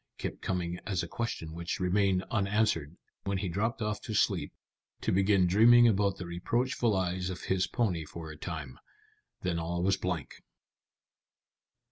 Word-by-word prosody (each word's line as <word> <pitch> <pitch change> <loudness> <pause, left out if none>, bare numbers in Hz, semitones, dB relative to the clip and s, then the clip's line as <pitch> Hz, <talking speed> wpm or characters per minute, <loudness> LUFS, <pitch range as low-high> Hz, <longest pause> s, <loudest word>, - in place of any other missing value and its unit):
kept - - -5
coming 90 -1 -2
as 95 -4 0
a - - -4
question 85 -6 -4
which 85 +1 -3
remained 95 0 +2
unanswered 100 -7 +1 0.3
when 100 0 0
he 95 - -2
dropped 110 +6 -1
off 105 -1 -2
to 110 - -5
sleep, - - +1 0.5
to - - -1
begin 95 0 +4
dreaming 120 +6 +7
about 100 -3 +2
the 90 - -6
reproachful 115 +6 0
eyes 90 0 -1
of 90 - -5
his 95 -1 +1
pony 95 -10 0
for 80 +1 -8
a - - -9
time. 75 -5 -6 0.6
Then 90 -2 0
all 85 +1 -2
was 95 +1 +3
blank. 90 -5 -4
95 Hz, 155 wpm, -30 LUFS, 85-105 Hz, 0.6 s, dreaming